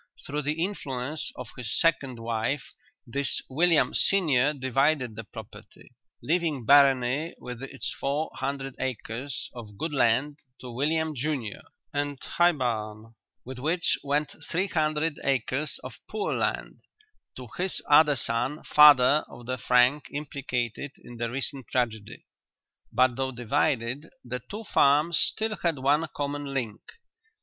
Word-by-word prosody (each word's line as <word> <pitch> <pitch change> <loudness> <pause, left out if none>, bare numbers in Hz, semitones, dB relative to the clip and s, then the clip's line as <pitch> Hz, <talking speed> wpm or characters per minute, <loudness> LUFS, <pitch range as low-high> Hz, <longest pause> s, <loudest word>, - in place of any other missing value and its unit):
Through 150 +1 -2
the 150 +3 0
influence 145 -6 -4
of 125 -2 -8
his 120 -3 -2
second 140 -7 +1
wife 115 +4 -2 0.3
this 140 +4 0
William 165 +3 +3
senior 150 -8 +3
divided 135 -2 0
the 115 - -6
property, - - -12 0.3
leaving 160 -6 0
Barony 140 +3 +4
with 125 -1 -8
its 135 0 -5
four 145 +3 -1
hundred 135 0 -4
acres 125 +1 -3
of 110 -4 -10
good 160 +5 -3
land 135 +3 +2 0.2
to 125 - -8
William 155 +5 0
junior, 130 -5 -3 0.3
and 145 -1 -2
High 175 +1 +3
Barn, 110 -4 -3 0.3
with 130 0 -7
which 165 +6 +1
went 145 +1 -1
three 180 +3 +1
hundred 155 -3 0
acres 135 +2 0
of 130 -1 -9
poor 215 -1 -2
land, - - -2 0.6
to 130 -1 -8
his 185 +1 0
other 150 0 +6
son, 120 +5 -1
father 150 -1 +7
of 120 0 -12
the 130 +1 -3
Frank 125 +4 +3
implicated 140 -3 -3
in 120 - -11
the 115 0 -2
recent 135 0 -3
tragedy. 115 -3 -2 0.7
But 130 +1 +3
though 135 0 -1
divided, 125 +2 -1 0.2
the 125 0 -4
two 215 +2 -6
farms 150 -2 +3
still 220 -1 +2
had 170 -3 0
one 145 +5 +2
common 145 -1 -3
link. 115 -5 -3
135 Hz, 135 wpm, -27 LUFS, 125-150 Hz, 0.7 s, father